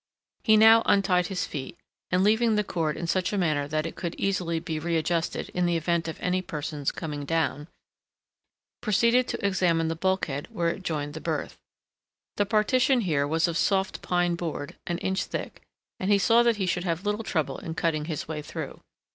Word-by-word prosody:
He 220 -2 +5
now 225 +1 +8
untied 185 -3 +3
his 190 -2 -2
feet, 130 -3 -6 0.3
and, 180 +1 +2
leaving 220 +2 +3
the 210 - +2
cord 165 -6 -2
in 170 - -3
such 180 +2 0
a 205 - -1
manner 155 -6 +1
that 155 +1 -1
it 165 - -5
could 170 -1 -4
easily 180 -4 0
be 160 -2 -4
readjusted 165 +1 -1
in 180 0 0
the 170 -1 +2
event 170 +1 0
of 160 - -6
any 185 +1 +1
person's 150 -4 -3
coming 150 -3 -5
down, 150 -1 -1 1.1
proceeded 235 +4 +3
to - - -3
examine 175 -4 +2
the 165 - -1
bulkhead 165 -5 -1
where 175 -7 -1
it 180 - -4
joined 150 -5 -3
the 160 - -7
berth. - - -3 0.8
The 205 - +1
partition 245 +5 +3
here 150 -8 +1
was 160 +3 +2
of 170 -1 -1
soft 195 0 +1
pine 175 -1 +1
board, 165 -4 -4
an 175 - -1
inch 190 +1 -1
thick, - - -6 0.4
and 190 - -1
he 205 - +6
saw 230 +4 +5
that 235 -2 +3
he 195 - 0
should 180 -1 -1
have 175 +1 -2
little 210 +2 -1
trouble 160 -7 -1
in 165 - -6
cutting 155 -3 0
his 155 -2 -4
way 155 -1 -4
through. - - -7
175 Hz, 195 wpm, -27 LUFS, 160-195 Hz, 1.1 s, now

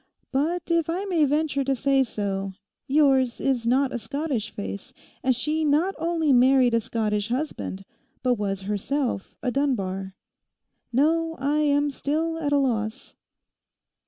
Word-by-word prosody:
But, 320 +6 0
if 335 -1 +2
I 365 +4 -1
may 345 -6 +2
venture 290 -1 +1
to 270 0 0
say 275 +1 +3
so, 195 -4 -3 0.3
yours 270 -4 +3
is 250 -4 0
not 265 +2 +2
a 240 - -2
Scottish 250 -1 -3
face; 200 -1 -7 0.3
and 255 -1 +2
she 305 +6 -1
not 310 +6 +2
only 325 -3 +1
married 255 0 +5
a 230 - +4
Scottish 210 -2 -1
husband, 240 -7 -3 0.4
but 250 -1 +3
was 200 -4 -2
herself 210 +3 -2
a 250 - 0
Dunbar. 195 -9 -1 0.8
No, 325 +5 +2
I 285 +3 0
am 290 -1 +2
still 320 +4 -1
at 290 -3 -1
a 285 - +4
loss. 225 -6 -1
270 Hz, 145 wpm, -25 LUFS, 230-300 Hz, 0.8 s, married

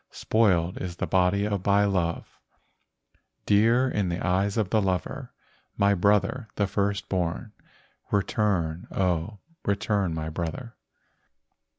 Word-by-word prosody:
Spoiled 90 -6 +1
is 90 -2 -5
the - - -2
body 95 +2 +2
by 100 0 +2
love, 90 -4 -2 1.1
Dear 115 +5 +4
in 105 -7 -1
the 85 +1 -2
eyes 95 +4 0
of 105 -4 0
the 110 - +3
lover. 95 -3 -2 0.5
My 100 0 +4
brother, 105 +5 +1
the 100 - +1
first 100 0 -1
born, 90 +4 -2 0.6
Return, 95 -5 0
oh, 90 +2 -1 0.3
return, 100 -3 0
my 80 0 -3
brother." 85 +9 -5
100 Hz, 115 wpm, -26 LUFS, 90-105 Hz, 1.1 s, Dear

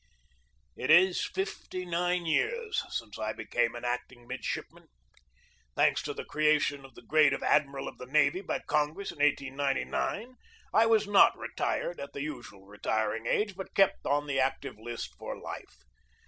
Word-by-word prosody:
It - - -4
is 175 +3 +6
fifty 190 -1 -4
nine 175 0 0
years 440 - 0
since 110 -3 -5
I 110 0 -2
became 120 +1 -1
an 120 - -6
acting 120 0 -4
midshipman. - - -5 0.9
Thanks - - +3
to - - -4
the - - -6
creation 150 -2 +2
of 135 - -14
the - - -13
grade 155 -3 +4
of - - -3
admiral 140 -2 +2
of - - -9
the 125 - -8
navy 150 +5 +3
by 200 - -3
Congress 150 +6 0
in - - -15
1899, 145 - 0 0.4
I 225 - +6
was 220 -2 +4
not 205 -1 +6
retired 175 - -2
at 140 0 -7
the 140 - -4
usual 120 -10 -8
retiring 110 +2 -2
age, 205 -1 +1
but 190 0 -8
kept 195 -1 +3
on 145 +1 +1
the 135 -2 -1
active 130 -4 -1
list 120 +1 -6
for - - -6
life. - - -8
145 Hz, 160 wpm, -30 LUFS, 125-180 Hz, 0.9 s, is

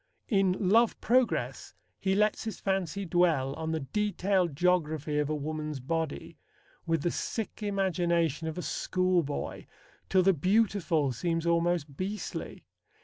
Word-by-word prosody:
In 195 -5 +3
Love 225 +4 +4
Progress 250 +2 0 0.2
he 190 0 +1
lets 210 +2 +1
his 220 - -5
fancy 195 0 -1
dwell 165 -6 +2
on 160 +2 -4
the 160 -1 -1
detailed 190 +1 0
geography 155 -3 +1
of 150 0 0
a 155 - 0
woman's 150 0 -4
body, 160 - -3 0.5
with 165 -3 +1
the 175 - +1
sick 225 -1 -4
imagination 170 -6 0
of 160 - -4
a 180 - -3
schoolboy, 180 -5 -1 0.4
till 185 -1 +4
the 195 +1 +5
beautiful 180 -4 +2
seems 165 +7 -1
almost 170 -4 +1
beastly. 200 +3 -5
175 Hz, 135 wpm, -29 LUFS, 155-195 Hz, 0.5 s, the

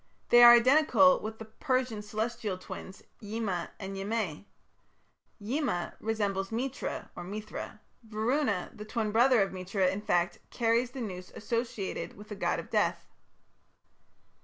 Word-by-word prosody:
They 240 - +8
are 240 0 +11
identical 275 +3 +5
with 220 +1 -6
the 225 - -8
Persian 255 -1 -1
Celestial 215 -1 -3
twins, 190 +1 -9 0.2
Yima 205 -4 -3
and 195 -1 -6
Yimeh. 195 -4 -3 0.9
Yima 230 - -2
resembles 200 -3 -1
Mitra 255 +4 -4
(Mithra); 210 +4 -7 0.2
Varuna, 220 -1 -1
the 210 - -8
twin 215 0 -2
brother 240 0 +5
of 195 - -4
Mitra, 185 0 0
in 195 +2 -3
fact, 175 -4 0
carries 235 +1 +1
the 255 0 -7
noose 185 -5 -6
associated 230 -3 -3
with 210 +1 -12
the 210 - -5
god 195 - 0
of - - -9
death. - - +1
215 Hz, 135 wpm, -30 LUFS, 195-240 Hz, 0.9 s, are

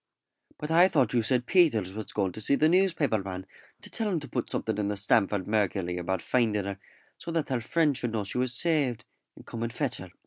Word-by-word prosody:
"But 150 +1 -5
I 175 +3 +6
thought 130 - +1
you 120 - +3
said 125 +2 +1
Peters 120 - +3
was 110 0 -6
going 95 -3 -1
to 110 - -8
see 140 - +2
the 155 - +3
newspaper 165 - +2
man 95 -1 -6 0.4
to - - -9
tell 220 -2 -2
him 180 -5 0
to 145 - -8
put - - -3
something 110 -2 -2
in 105 - 0
the 105 0 -2
Stamford 100 -1 +1
Mercury 100 -4 0
about 90 0 -2
finding 110 -5 +1
her, 100 0 -5 0.4
so - - -8
that 165 -3 -1
her 130 -3 -1
friends 150 +3 +1
should 120 -2 -3
know 110 -2 -1
she 100 +5 -3
was 125 -1 0
saved, 145 -7 0 0.3
and - - -15
come 115 - -7
and 115 0 -2
fetch 135 +1 -1
her." 95 - -9
115 Hz, 235 wpm, -28 LUFS, 100-150 Hz, 0.4 s, I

